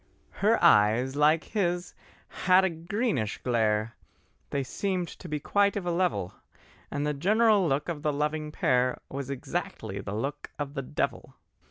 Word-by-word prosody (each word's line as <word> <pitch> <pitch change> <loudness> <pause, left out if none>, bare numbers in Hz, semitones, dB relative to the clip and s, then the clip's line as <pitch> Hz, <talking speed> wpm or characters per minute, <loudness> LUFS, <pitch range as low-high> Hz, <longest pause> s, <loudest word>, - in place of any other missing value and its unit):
Her - - +4
eyes, 115 +6 +5
like 155 +2 +4
his, 180 -4 -1 0.3
had 185 +1 +3
a 190 - 0
greenish 165 - -2
glare, 110 -2 +1 0.5
They 140 -1 -1
seemed 185 +6 -2
to 180 - -10
be 150 0 -2
quite 200 +6 +2
of 200 -3 -3
a 175 - 0
level, 170 - 0 0.6
And 145 - -2
the 150 - 0
general 205 +5 +3
look 140 0 0
of 165 -4 -4
the 150 -1 +1
loving 150 +1 -2
pair 125 -3 +1
Was 135 0 -5
exactly 140 - -4
the 100 +1 -5
look 135 +7 -4
of 145 -1 -4
the 135 - -3
devil. 135 0 -3
150 Hz, 160 wpm, -28 LUFS, 130-180 Hz, 0.6 s, eyes